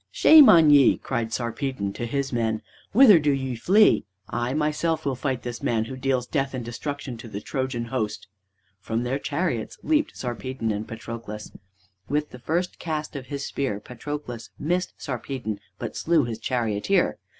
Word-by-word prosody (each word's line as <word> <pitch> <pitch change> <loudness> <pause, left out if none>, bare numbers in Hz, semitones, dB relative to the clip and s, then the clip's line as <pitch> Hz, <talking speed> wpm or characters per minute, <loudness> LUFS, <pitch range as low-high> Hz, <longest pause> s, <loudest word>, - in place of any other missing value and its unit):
"Shame 305 -3 +8
on 160 -3 +7
ye!" 140 -3 +6
cried 115 -3 -3
Sarpedon 120 -3 -2
to 120 - -4
his 135 +1 -2
men, 110 -2 0 0.3
"whither 215 -6 +8
do 150 -1 +1
ye 135 -2 -1
flee? 200 - +4 0.2
I 120 +1 -2
myself 155 +1 0
will 140 - +1
fight 130 -1 -2
this 120 -1 -5
man 110 -2 0
who 130 - -7
deals 130 -1 0
death 135 -1 -1
and 125 -2 -4
destruction 140 +1 -5
to 115 - -10
the 100 -2 -5
Trojan 130 0 -3
host." 110 -4 -3 0.5
From 115 +3 -2
their 130 +3 -1
chariots 145 -7 -2
leaped 310 -1 +1
Sarpedon 125 -1 -3
and 105 +1 -3
Patroclus. 115 -2 -7 0.6
With 150 +2 -1
the 125 - -10
first 170 +7 -2
cast 155 -3 -4
of 130 -2 -6
his 140 -1 -4
spear 130 -8 -2
Patroelus 125 0 -7
missed 180 +4 -1
Sarpedon, 125 -5 -4 0.2
but 115 -3 -5
slew 165 -2 +2
his 115 -2 -4
charioteer. 120 - 0
130 Hz, 165 wpm, -25 LUFS, 115-150 Hz, 0.6 s, Shame